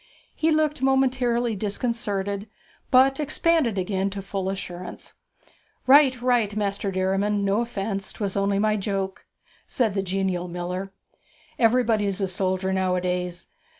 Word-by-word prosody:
He 320 - +1
looked 310 -3 +1
momentarily 255 -3 +2
disconcerted, 205 -1 -2 0.4
but 270 +2 +5
expanded 305 -5 +1
again 190 +1 -1
to 200 0 -6
full 195 -1 -3
assurance. 180 -2 -7 0.7
'Right, 265 -1 +6
right, 235 -5 +2
Master 200 -1 -1
Derriman, 195 +2 0
no 200 +3 +2
offence 200 -4 -3
'twas 200 -3 -3
only 200 0 +1
my 215 +1 +2
joke,' 195 -1 -3 0.4
said 225 -5 0
the 195 - 0
genial 190 -1 -1
miller. 180 +2 -4 0.7
'Everybody's 225 -4 +2
a 195 - 0
soldier 190 0 -1
nowadays. 180 -1 -1
200 Hz, 120 wpm, -24 LUFS, 190-240 Hz, 0.7 s, Right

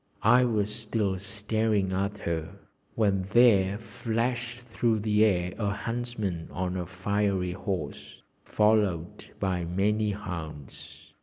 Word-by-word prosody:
I 125 +3 +6
was 105 -3 0
still 105 -4 -1
staring 105 0 0
at 100 +2 -1
her 80 -4 -3 0.4
when 100 -4 +1
there 100 -5 +5
flashed 120 +2 -2
through 115 -2 0
the 105 0 +3
air 90 -4 +2
a 105 -2 +1
huntsman 110 -5 -3
on 90 0 -3
a 90 -2 -3
fiery 95 0 0
horse, 95 -2 -5 0.2
followed 105 -6 +1
by 95 -3 0
many 105 +5 +1
hounds. 85 -8 -7
100 Hz, 120 wpm, -28 LUFS, 95-110 Hz, 0.4 s, I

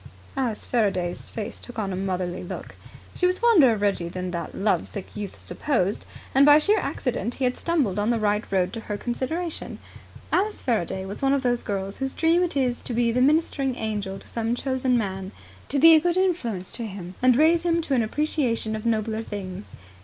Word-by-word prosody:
Alice 245 -5 -2
Faraday's 190 -7 -1
face 215 -2 -6
took 245 - -9
on 200 -3 -2
a - - -2
motherly 185 -1 -2
look. 175 - -7 0.4
She 360 - +2
was 365 0 +1
fonder 375 - +6
of 215 -2 -1
Reggie 190 -4 0
than 180 +1 -4
that 170 -2 -5
love 205 +1 +1
sick 200 -3 -8
youth 205 -2 -6
supposed, 215 -9 -1 0.3
and 270 - +6
by 290 +1 +8
sheer 410 +8 +3
accident 240 -2 -2
he 270 - -4
had 250 0 +2
stumbled 275 - 0
on 210 +2 +1
the 235 - +2
right 210 0 +1
road 185 0 +1
to 230 - -4
her 210 -2 -4
consideration. 305 +9 -3 0.5
Alice 415 +3 +1
Faraday 190 -5 -1
was 195 +1 -7
one 275 0 +3
of 275 -1 +1
those 245 -1 +1
girls 195 -1 -3
whose 270 0 -3
dream 335 +2 +3
it 350 -5 0
is 250 -3 0
to 240 - -5
be 235 0 +2
a 250 +2 +1
ministering 275 -2 +2
angel 205 -4 -3
to - - -11
some 230 0 -1
chosen 260 -1 0
man, 190 -3 -3 0.4
to 280 - +1
be 325 +4 +8
a 315 - +6
good 350 +1 +1
influence 245 - 0
to 235 -2 -4
him 185 -3 -8
and 255 -1 +5
raise 320 +5 +4
him 340 -1 +1
to 280 - -1
an 250 - +3
appreciation 230 -3 -1
of 215 +1 -4
nobler 220 -1 0
things. 200 -3 -7
235 Hz, 205 wpm, -25 LUFS, 200-280 Hz, 0.5 s, by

